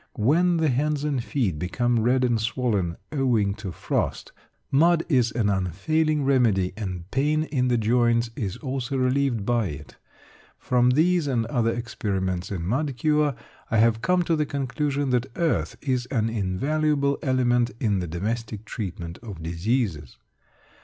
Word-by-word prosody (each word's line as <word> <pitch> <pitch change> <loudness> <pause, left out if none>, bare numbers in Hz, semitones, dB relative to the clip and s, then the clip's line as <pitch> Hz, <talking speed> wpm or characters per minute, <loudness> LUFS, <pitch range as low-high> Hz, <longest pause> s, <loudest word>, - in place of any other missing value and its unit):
When 170 +10 +3
the 160 -2 +2
hands 145 +3 0
and 140 -5 -1
feet 110 - -1
become 120 +7 0
red 125 +3 +2
and 120 -3 +1
swollen 110 -7 -1
owing 120 -9 +1
to 100 -2 -6
frost, - - -2 0.4
mud 165 +4 +4
is 125 -6 +3
an 110 -3 +1
unfailing 135 - 0
remedy, 115 -9 +2
and 95 -5 -5
pain 150 +3 +1
in 130 -5 0
the 125 -1 +2
joints 115 +1 +2
is 100 -4 -3
also 135 -1 -3
relieved 130 -4 +1
by 120 -3 +1
it. 75 -5 -9 0.6
From 125 0 +2
these 165 +4 +3
and 120 -4 0
other 115 -1 0
experiments 95 -6 -3
in 90 -4 -4
mud 130 - -1
cure, 150 +1 +2 0.3
I 110 - +1
have 115 0 +3
come 180 0 +2
to 165 -1 +1
the 150 -1 0
conclusion 140 0 -1
that 125 -2 +1
earth 165 -2 0
is 130 -3 -1
an 115 -4 0
invaluable 140 +8 0
element 125 -2 +2
in 105 -5 +1
the 90 - -3
domestic 105 +5 -4
treatment 85 -5 -6
of 100 -8 -8
diseases. 85 - -2
120 Hz, 155 wpm, -25 LUFS, 105-140 Hz, 0.6 s, mud